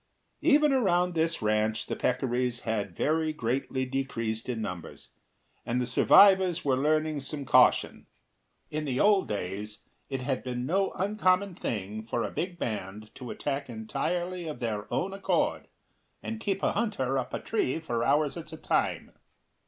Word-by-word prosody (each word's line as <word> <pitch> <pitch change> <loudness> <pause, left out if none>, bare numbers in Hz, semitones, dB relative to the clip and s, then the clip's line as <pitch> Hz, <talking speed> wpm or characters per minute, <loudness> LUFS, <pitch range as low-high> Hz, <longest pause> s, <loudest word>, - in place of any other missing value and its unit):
Even 300 -2 +5
around 180 -8 +2
this 165 -4 0
ranch 110 +1 +1
the - - -3
peccaries 125 -1 0
had 105 -5 -2
very 155 +1 +1
greatly 130 -1 -2
decreased 120 -4 -3
in 120 -3 -2
numbers, 90 -6 -6 0.5
and 120 +1 -1
the 125 - 0
survivors 185 +7 +5
were 135 -2 +3
learning 155 +2 +1
some 140 +1 -4
caution. - - +4 0.6
In 155 0 -2
the 130 -2 -1
old 205 -2 +4
days 105 +1 -5 0.3
it 135 -1 -3
had 130 0 -1
been 125 -1 -3
no 190 +7 +1
uncommon 195 -1 +1
thing 110 - -4
for 115 +1 -2
a - - -3
big 175 0 -3
band 105 - -5
to 125 - -9
attack 140 -2 -3
entirely 170 +10 -3
of 155 - -5
their 105 -4 -3
own 175 +11 -1
accord, 195 - 0 0.6
and 225 -1 -4
keep 195 -3 -2
a - - +3
hunter 135 - 0
up 125 - -5
a - - -3
tree 165 - -1
for 120 -7 -2
hours 145 +4 +2
at 170 -2 -8
a 160 - -7
time. - - -1
135 Hz, 160 wpm, -28 LUFS, 115-175 Hz, 0.6 s, Even